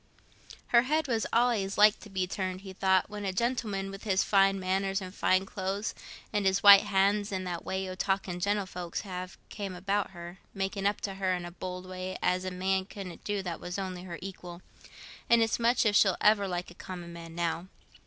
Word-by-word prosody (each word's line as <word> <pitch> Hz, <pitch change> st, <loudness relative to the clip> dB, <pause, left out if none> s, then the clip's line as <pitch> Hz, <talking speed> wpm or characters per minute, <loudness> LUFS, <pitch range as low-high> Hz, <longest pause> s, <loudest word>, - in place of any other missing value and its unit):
"Her 235 Hz, -, +6 dB
head 300 Hz, +4 st, 0 dB
was 230 Hz, -3 st, 0 dB
allays 230 Hz, -5 st, +2 dB
likely 210 Hz, 0 st, +6 dB
to 210 Hz, -, -11 dB
be 190 Hz, -2 st, -1 dB
turned," 185 Hz, 0 st, -4 dB
he 190 Hz, -1 st, -9 dB
thought, 190 Hz, 0 st, +2 dB
"when 210 Hz, -1 st, -7 dB
a 195 Hz, -, -1 dB
gentleman, 205 Hz, -2 st, -1 dB
with 195 Hz, 0 st, -9 dB
his 195 Hz, -3 st, +2 dB
fine 195 Hz, -1 st, +3 dB
manners, 195 Hz, +1 st, 0 dB
and 185 Hz, -1 st, -8 dB
fine 185 Hz, -1 st, +2 dB
clothes, 195 Hz, +2 st, -3 dB, 0.4 s
and 205 Hz, -1 st, +1 dB
his 190 Hz, +1 st, +2 dB
white 200 Hz, 0 st, +10 dB
hands, 205 Hz, +1 st, +2 dB
and 185 Hz, -1 st, -3 dB
that 175 Hz, -2 st, -4 dB
way 190 Hz, 0 st, -3 dB
o' 185 Hz, -, -5 dB
talking 190 Hz, -1 st, -1 dB
gentlefolks 185 Hz, -3 st, -2 dB
have, 185 Hz, -2 st, -7 dB
came 200 Hz, -3 st, -5 dB
about 195 Hz, +3 st, -1 dB
her, 175 Hz, 0 st, -10 dB, 0.2 s
making 195 Hz, +1 st, -1 dB
up 205 Hz, -, -1 dB
to 195 Hz, -, -3 dB
her 190 Hz, -1 st, 0 dB
in 175 Hz, -1 st, -5 dB
a 175 Hz, -, -7 dB
bold 180 Hz, +1 st, -6 dB
way, 185 Hz, 0 st, -5 dB
as 180 Hz, +1 st, 0 dB
a -, -, -1 dB
man 190 Hz, +1 st, 0 dB
couldn't 190 Hz, -3 st, -9 dB
do 205 Hz, -2 st, -2 dB
that 175 Hz, -3 st, -4 dB
was 180 Hz, +1 st, -5 dB
only 185 Hz, -2 st, -4 dB
her 175 Hz, -2 st, -7 dB
equal; 180 Hz, -2 st, -8 dB, 0.7 s
and 235 Hz, -1 st, +6 dB
it's 225 Hz, +1 st, 0 dB
much 235 Hz, +1 st, +3 dB
if 210 Hz, -1 st, +3 dB
she'll 195 Hz, -3 st, +5 dB
ever 210 Hz, -1 st, +4 dB
like 180 Hz, -1 st, -4 dB
a -, -, -11 dB
common 175 Hz, -1 st, -8 dB
man 165 Hz, -1 st, -9 dB
now." 170 Hz, +1 st, -2 dB
190 Hz, 210 wpm, -29 LUFS, 185-205 Hz, 0.7 s, white